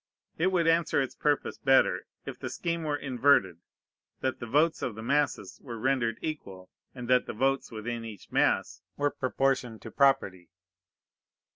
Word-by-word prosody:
It 170 Hz, -, +3 dB
would 175 Hz, -3 st, +2 dB
answer 165 Hz, 0 st, +3 dB
its 135 Hz, -2 st, -1 dB
purpose 145 Hz, -1 st, -1 dB
better, 135 Hz, -1 st, +3 dB, 0.2 s
if -, -, -7 dB
the -, -, -5 dB
scheme 170 Hz, -1 st, -3 dB
were 150 Hz, -2 st, -1 dB
inverted: 125 Hz, -, +2 dB, 0.6 s
that 130 Hz, 0 st, -1 dB
the 120 Hz, -, -6 dB
votes 155 Hz, +7 st, +2 dB
of 120 Hz, -, -3 dB
the 110 Hz, -, -7 dB
masses 140 Hz, -6 st, 0 dB
were 120 Hz, -4 st, -7 dB
rendered 120 Hz, -2 st, 0 dB
equal, 95 Hz, -13 st, -6 dB, 0.2 s
and 125 Hz, -2 st, -7 dB
that 125 Hz, 0 st, +3 dB
the -, -, -4 dB
votes 135 Hz, +4 st, 0 dB
within 115 Hz, +1 st, -5 dB
each 110 Hz, -4 st, -10 dB
mass -, -, +1 dB, 0.2 s
were 145 Hz, 0 st, +1 dB
proportioned 130 Hz, -3 st, -1 dB
to -, -, -8 dB
property. 95 Hz, -, +2 dB
130 Hz, 160 wpm, -28 LUFS, 115-145 Hz, 0.6 s, It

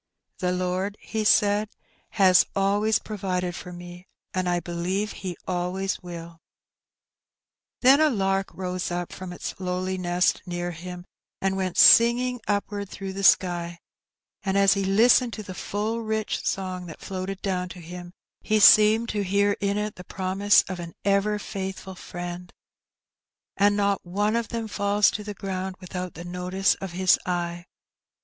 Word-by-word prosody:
" -, -, -42 dB
The 180 Hz, -1 st, 0 dB
Lord," 185 Hz, +3 st, -2 dB
he 220 Hz, -1 st, -3 dB
said, 210 Hz, 0 st, +3 dB
'^ -, -, -39 dB, 0.4 s
has 190 Hz, -4 st, +5 dB
always 205 Hz, +2 st, +2 dB
provided 185 Hz, -4 st, -3 dB
for 180 Hz, -, -8 dB
me; 175 Hz, +1 st, -11 dB, 0.3 s
I 180 Hz, -1 st, 0 dB
believe 180 Hz, +5 st, -2 dB
He 185 Hz, -3 st, -6 dB
always 185 Hz, +2 st, -2 dB
will/' 170 Hz, -2 st, -9 dB, 1.4 s
Then 270 Hz, +4 st, +6 dB
a 310 Hz, -, +5 dB
lark 195 Hz, -5 st, 0 dB
rose 185 Hz, -1 st, -4 dB
up 175 Hz, 0 st, -4 dB
from 185 Hz, -1 st, -7 dB
its 175 Hz, -, -5 dB
lowly 185 Hz, 0 st, -2 dB
nest 180 Hz, 0 st, +1 dB
near 175 Hz, 0 st, -3 dB
him, 175 Hz, +1 st, -8 dB, 0.3 s
and 190 Hz, 0 st, 0 dB
went 185 Hz, -2 st, -2 dB
singing 245 Hz, +1 st, +6 dB
upward 205 Hz, -1 st, -2 dB
through 195 Hz, -1 st, -6 dB
the 195 Hz, +1 st, -5 dB
sky, 175 Hz, -2 st, +3 dB, 0.6 s
and 195 Hz, -1 st, -1 dB
as 195 Hz, 0 st, +5 dB
he 200 Hz, -1 st, -1 dB
listened 230 Hz, +5 st, +4 dB
to 215 Hz, -, -6 dB
the 185 Hz, -, -8 dB
full 210 Hz, +5 st, -3 dB
rich 220 Hz, -1 st, -2 dB
song 185 Hz, -2 st, -3 dB
that 165 Hz, -, -10 dB
floated 190 Hz, 0 st, -5 dB
down 180 Hz, -2 st, -1 dB
to 180 Hz, -, -10 dB
him, 175 Hz, +1 st, -9 dB, 0.3 s
he 215 Hz, -1 st, +1 dB
seemed 215 Hz, +2 st, +7 dB
to 205 Hz, -1 st, -1 dB
hear 200 Hz, +1 st, +2 dB
in 200 Hz, 0 st, 0 dB
it 210 Hz, 0 st, -3 dB
the 180 Hz, -, -9 dB
promise 195 Hz, +3 st, +2 dB
of 185 Hz, -2 st, -6 dB
an 170 Hz, -1 st, -7 dB
ever 200 Hz, +1 st, +2 dB
faithful 190 Hz, -2 st, -6 dB
Friend 175 Hz, 0 st, -7 dB, 0.6 s
— -, -, -67 dB
"And 205 Hz, +1 st, +3 dB
not 200 Hz, -1 st, +1 dB
one 205 Hz, +5 st, 0 dB
of 235 Hz, -1 st, -1 dB
them 230 Hz, -1 st, -4 dB
falls 205 Hz, 0 st, +2 dB
to 210 Hz, -, -5 dB
the 205 Hz, 0 st, -6 dB
ground 190 Hz, -1 st, -4 dB
without 180 Hz, -1 st, -6 dB
the 170 Hz, +2 st, -8 dB
notice 180 Hz, +2 st, 0 dB
of 190 Hz, -3 st, -6 dB
His 185 Hz, +1 st, +3 dB
eye. 175 Hz, -1 st, -3 dB
190 Hz, 165 wpm, -25 LUFS, 180-205 Hz, 1.4 s, seemed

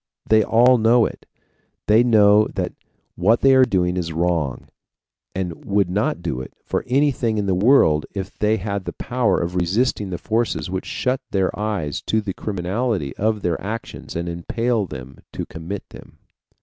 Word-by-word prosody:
They 110 Hz, 0 st, +5 dB
all 120 Hz, +4 st, +4 dB
know 115 Hz, +1 st, +4 dB
it. -, -, -7 dB, 0.6 s
They 110 Hz, +2 st, +5 dB
know 105 Hz, -3 st, +5 dB
that -, -, -2 dB, 0.4 s
what 110 Hz, +7 st, +2 dB
they 135 Hz, 0 st, +6 dB
are 130 Hz, -1 st, +6 dB
doing 90 Hz, -4 st, 0 dB
is 85 Hz, -2 st, -2 dB
wrong, 80 Hz, -5 st, -1 dB, 0.7 s
and 90 Hz, -3 st, -4 dB
would 100 Hz, -3 st, +1 dB
not 100 Hz, +3 st, -1 dB
do 65 Hz, -, -2 dB
it 65 Hz, -, -10 dB
for -, -, -2 dB
anything 130 Hz, -4 st, +1 dB
in 105 Hz, -, 0 dB
the 95 Hz, -, +1 dB
world 90 Hz, -, +4 dB
if 95 Hz, -1 st, -5 dB
they 105 Hz, +1 st, +2 dB
had 100 Hz, -1 st, -4 dB
the -, -, -5 dB
power 120 Hz, -7 st, 0 dB
of 85 Hz, +1 st, -3 dB
resisting 100 Hz, +3 st, 0 dB
the 90 Hz, -, -3 dB
forces 110 Hz, -8 st, -1 dB
which 95 Hz, 0 st, -4 dB
shut 130 Hz, 0 st, -1 dB
their 95 Hz, -2 st, +1 dB
eyes 105 Hz, -9 st, -3 dB
to 110 Hz, -, +2 dB
the 105 Hz, -3 st, -4 dB
criminality 95 Hz, -, -2 dB
of 110 Hz, 0 st, 0 dB
their 85 Hz, -2 st, -1 dB
actions 110 Hz, +3 st, -6 dB
and 85 Hz, +1 st, -3 dB
impel 110 Hz, +6 st, -1 dB
them 65 Hz, -2 st, -9 dB, 0.2 s
to -, -, -4 dB
commit 85 Hz, +5 st, -7 dB
them. -, -, -14 dB
100 Hz, 175 wpm, -21 LUFS, 90-115 Hz, 0.7 s, they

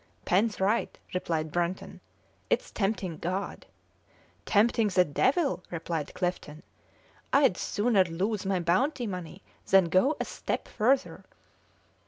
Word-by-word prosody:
"Pen's 205 Hz, +4 st, +2 dB
right!" 205 Hz, +4 st, 0 dB, 0.2 s
replied 160 Hz, -4 st, -2 dB
Brunton; 175 Hz, +2 st, -3 dB, 0.5 s
"it's -, -, 0 dB
tempting 195 Hz, -5 st, -2 dB
God!" 185 Hz, +3 st, -4 dB, 0.8 s
"Tempting 220 Hz, +1 st, +3 dB
the 185 Hz, -2 st, +3 dB
devil!" 265 Hz, -, +1 dB
replied 165 Hz, -3 st, -4 dB
Clifton. 175 Hz, -4 st, -3 dB, 0.7 s
"I'd 275 Hz, -9 st, +4 dB
sooner 205 Hz, 0 st, +2 dB
lose 190 Hz, +5 st, -2 dB
my 190 Hz, -1 st, 0 dB
bounty 240 Hz, -, +1 dB
money 180 Hz, -2 st, -6 dB, 0.3 s
than 190 Hz, -3 st, +5 dB
go 260 Hz, -, +3 dB
a -, -, -1 dB
step -, -, -4 dB
further." 255 Hz, +5 st, 0 dB
190 Hz, 115 wpm, -28 LUFS, 175-220 Hz, 0.8 s, than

